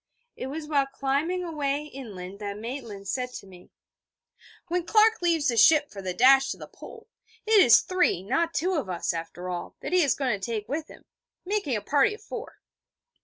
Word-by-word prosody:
It 255 - -5
was 300 +3 -6
while 280 -3 +1
climbing 280 +7 -1
away 295 -4 -2
inland 200 -10 -9
that 205 -1 -5
Maitland 225 -4 -7
said 250 +3 -3
to - - -8
me: 180 -2 -16 1.0
'When 355 0 -1
Clark 440 +4 +4
leaves 335 -4 +2
the 235 - -1
ship 295 +6 +5
for 200 - -8
the 185 -1 -3
dash 270 +4 +5
to - - -4
the - - -9
Pole, 450 -1 -13 0.4
it 435 -2 +6
is 235 - +7
three, 360 - +1
not 330 - 0
two, 335 +6 0
of 280 - -2
us, 175 -1 -2
after 170 +2 -6
all, 175 -1 -5
that - - -5
he 365 - +5
is 285 -5 +2
going 250 -7 -1
to - - -16
take 215 -1 -3
with 305 +3 -3
him, - - -15 0.4
making 385 - -1
a 210 - -2
party 290 - +2
of - - -17
four.' - - -8
275 Hz, 200 wpm, -26 LUFS, 210-330 Hz, 1.0 s, is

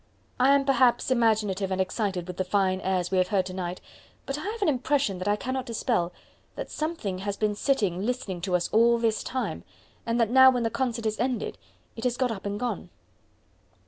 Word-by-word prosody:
I 270 +2 +6
am 275 -1 +2
perhaps 255 -2 +3
imaginative 215 -5 +2
and 190 0 -2
excited 190 -1 -1
with 180 0 -7
the 185 - +1
fine 185 0 +1
airs 185 -1 -1
we 190 - +2
have 185 - +2
heard 195 -3 +1
to 185 - -6
night, 180 -1 -4 0.4
but 275 - -3
I 300 - -5
have 425 +4 -3
an - - +2
impression 265 -7 +1
that 185 - -4
I 205 - +3
cannot 260 +3 -3
dispel 225 -6 0 0.4
that - - -6
something 305 - -3
has 200 +1 -3
been 215 -1 +1
sitting 205 -6 0
listening 210 -7 -3
to 180 0 0
us 175 - +1
all 235 +2 +4
this 225 -2 0
time, 260 0 -3 0.4
and 230 +1 -1
that 230 -1 +2
now 260 +1 +8
when 250 -2 +1
the 225 - 0
concert 240 -3 -2
is 215 0 -1
ended 250 -2 -2 0.4
it 225 - -7
has 245 -1 0
got 255 -2 +1
up 200 -2 -5
and 200 +1 -3
gone." 245 +1 -3
220 Hz, 210 wpm, -27 LUFS, 190-255 Hz, 0.4 s, now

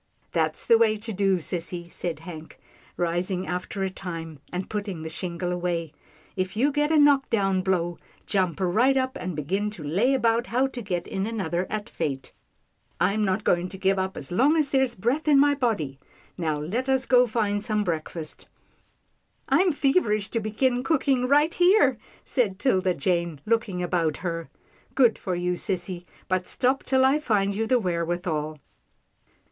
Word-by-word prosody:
" - - -44
That's 160 -2 0
the 230 -1 +5
way 220 -2 +3
to 220 +1 -6
do, 195 -1 +2
sissy," 175 +1 -4
said 165 -3 -4
Hank, 160 -2 -10 0.4
ris 175 +1 0
ing 185 -1 -2
after 180 +2 -3
a 190 - 0
time, 165 -5 -7
and 180 +1 -3
putting 200 -6 -4
the 160 - -5
shingle 175 +2 -3
away. 175 -3 -2 0.4
"If 185 +2 -3
you 275 +6 +3
get 295 +2 +1
a 320 - +4
knock 285 -2 +5
down 195 -4 +1
blow, 175 -2 -1 0.3
jump 185 -6 0
right 225 +9 +3
up 260 0 0
and 180 -2 -4
begin 190 +8 -1
to 205 -7 -9
lay 200 - +2
about 235 -1 +1
how 250 +4 +2
to 260 -2 -5
get 180 -5 -3
in 195 +2 -2
another 185 -5 -2
at 215 0 -3
fate. 140 - -4 0.7
I'm 200 +5 +2
not 195 +1 0
going 175 +1 +1
to 190 - -8
give 190 0 +1
up 190 +1 -2
as 135 - -6
long 270 - +3
as 300 -3 +2
there's 265 -3 +2
breath 250 +11 -1
in 290 -2 +6
my 290 +1 +5
body 205 - -1 0.2
— - - -28
Now 155 -4 -1
let 225 - -2
us 265 0 +2
go 250 -1 +5
find 210 -2 0
some 215 -1 0
breakfast." 160 -2 -4 0.5
" - - -32
I'm 370 -1 +4
feverish 270 - +1
to 230 - 0
begin 245 +4 0
cooking 270 -3 +1
right 295 +4 +4
here," 370 +5 +4 0.2
said 215 -8 0
'Tilda 190 -6 +1
Jane 170 0 -1
looking 215 -5 0
about 170 -3 0
her. 165 -1 -3 0.2
" 255 - -33
Good 250 -4 +4
for 185 - -2
you, 180 0 -1
sissy, 180 -1 -2 0.2
but 185 -1 -1
stop 260 +2 +1
till 260 0 +3
I 275 +3 +4
find 205 -8 +1
you 220 +3 -1
the 255 - +4
wherewithal. 170 -5 -2
195 Hz, 185 wpm, -25 LUFS, 175-245 Hz, 0.7 s, in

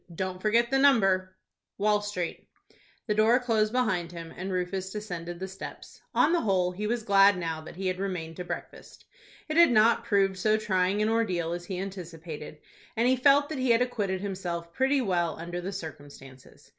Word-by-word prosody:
"Don't 185 +1 -4
forget 230 +3 +2
the 270 - +3
number, 195 -9 +3 0.2
—— - - -62
Wall 210 0 +2
Street." 195 -5 -4 0.6
The 210 - 0
door 220 +4 +4
closed 220 -4 +1
behind 200 -9 0
him, 165 -1 -8
and 190 +2 -5
Rufus 185 +1 -2
descended 175 -5 -6
the 190 - -4
steps. 190 +1 -10
On 330 - +4
the 345 - +2
whole, 185 -4 +1
he 205 +4 -4
was 235 0 -1
glad 200 -1 +5
now 165 -2 -3
that 155 - -11
he 190 +2 -5
had 185 0 -1
remained 175 -5 -4
to 180 - -4
breakfast. - - -8 0.4
It 310 0 -2
had 340 0 +8
not 225 0 +4
proved 195 -2 +1
so 215 +3 +3
trying 200 -1 +1
an 215 - +1
ordeal 185 -8 0
as 175 0 -4
he 185 0 -5
anticipated, 165 -5 -7 0.4
and 235 +2 +3
he 260 - +4
felt 280 +2 +4
that 310 -4 -4
he 260 -1 0
had 235 +1 +5
acquitted 200 -7 -2
himself 175 -4 -4
pretty 270 +1 +2
well 175 -7 0
under 175 +2 -5
the 190 +3 -4
circumstances. 145 -7 -11
195 Hz, 195 wpm, -28 LUFS, 175-220 Hz, 0.6 s, had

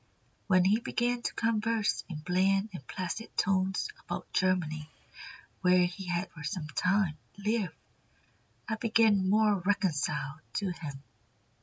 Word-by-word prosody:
When 185 -2 +5
he 205 +4 +4
began 240 0 0
to - - -2
converse 225 -1 +1
in 155 -4 -5
bland 195 +5 +2
and 135 -8 -9
placid 185 +5 -5
tones 190 0 +1 0.2
about - - -6
Germany, 160 -5 +1 0.7
where 180 0 +5
he 180 +2 -5
had 175 +1 -1
for 165 - -10
some 150 +2 -3
time 180 0 +1 0.2
lived, 210 -1 -1 0.9
I 220 -2 -1
became 215 -4 +3
more 210 -1 +4
reconciled 155 -6 0
to 200 -3 0
him." 145 -5 -7
185 Hz, 130 wpm, -30 LUFS, 175-210 Hz, 0.9 s, When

